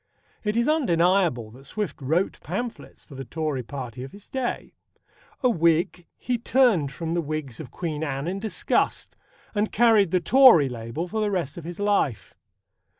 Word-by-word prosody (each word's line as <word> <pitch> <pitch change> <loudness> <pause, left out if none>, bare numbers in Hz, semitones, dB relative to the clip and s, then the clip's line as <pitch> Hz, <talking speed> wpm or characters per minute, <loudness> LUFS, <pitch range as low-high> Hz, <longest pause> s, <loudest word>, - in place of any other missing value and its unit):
It 210 +1 -1
is 235 - +2
undeniable 175 - +2
that 130 +4 -15
Swift 210 -4 -4
wrote 160 +8 0
pamphlets 220 +9 -6
for 145 - -14
the 135 0 -6
Tory 150 +1 -3
Party 125 -1 -7
of 130 - -8
his 200 0 -14
day. 260 -2 -3 0.7
A 255 - +5
Whig, 170 0 +1
he 245 -2 -2
turned 230 - +3
from 165 +3 -5
the 170 0 +1
Whigs 150 -6 -5
of 150 -6 -8
Queen 155 +1 -4
Anne 140 -2 -3
in 185 +3 -3
disgust, 215 0 -1 0.4
and 210 0 0
carried 220 -4 +4
the 185 - +2
Tory 175 - +6
label 120 +8 -5
for 220 +4 -2
the 210 - +1
rest 175 -8 -2
of 170 - -9
his 175 +2 -7
life. 200 - 0
170 Hz, 170 wpm, -25 LUFS, 140-210 Hz, 0.7 s, Tory